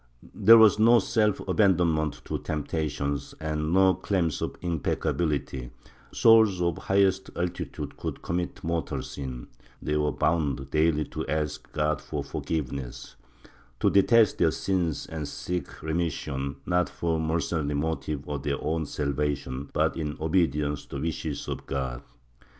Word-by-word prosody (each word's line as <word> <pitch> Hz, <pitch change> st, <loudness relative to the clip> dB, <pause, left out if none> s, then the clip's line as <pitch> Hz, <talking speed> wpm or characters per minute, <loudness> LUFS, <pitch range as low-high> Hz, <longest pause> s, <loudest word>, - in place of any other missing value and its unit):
There 115 Hz, +1 st, +8 dB
was 110 Hz, -1 st, +6 dB
no 115 Hz, +2 st, +7 dB
self 105 Hz, -1 st, +1 dB
abandonment 85 Hz, -6 st, +2 dB
to -, -, -3 dB
temptations 75 Hz, -2 st, -3 dB
and 75 Hz, 0 st, -2 dB
no 95 Hz, +1 st, +5 dB
claim 95 Hz, -1 st, 0 dB
of -, -, -4 dB
impecca 85 Hz, -4 st, -1 dB
bility; 70 Hz, -6 st, -2 dB, 0.4 s
souls 110 Hz, -5 st, +5 dB
of 85 Hz, -1 st, +1 dB
the -, -, -10 dB
highest 95 Hz, -1 st, +2 dB
altitude 85 Hz, 0 st, -4 dB
could -, -, -5 dB
commit 85 Hz, 0 st, -3 dB
mortal 85 Hz, 0 st, -2 dB
sin; 65 Hz, -3 st, -6 dB, 0.3 s
they 75 Hz, -, -2 dB
were 75 Hz, 0 st, +1 dB
bound 70 Hz, -5 st, 0 dB
daily 75 Hz, 0 st, +2 dB
to -, -, -5 dB
ask 75 Hz, -1 st, -3 dB
God 75 Hz, -1 st, 0 dB
for -, -, -4 dB
forgiveness, 70 Hz, -5 st, -4 dB, 0.6 s
to -, -, +3 dB
detest 110 Hz, +1 st, +4 dB
their 85 Hz, -, +5 dB
sins 90 Hz, -2 st, -1 dB
and 80 Hz, -3 st, -5 dB
seek 85 Hz, +1 st, -5 dB
remission, 75 Hz, -4 st, -2 dB
not 90 Hz, 0 st, +1 dB
for 80 Hz, -1 st, -1 dB
the -, -, -1 dB
mercenary 80 Hz, -2 st, -1 dB
motive 75 Hz, -1 st, -2 dB
of 75 Hz, -2 st, -3 dB
their 70 Hz, 0 st, -1 dB
own 80 Hz, 0 st, -1 dB
salvation 70 Hz, -2 st, -2 dB
but -, -, +1 dB
in 75 Hz, -3 st, -3 dB
obedience 75 Hz, -3 st, +1 dB
to -, -, -8 dB
the 70 Hz, -, -3 dB
wishes 80 Hz, -2 st, -3 dB
of -, -, -5 dB
God. 65 Hz, -3 st, -3 dB
80 Hz, 145 wpm, -27 LUFS, 75-90 Hz, 0.6 s, There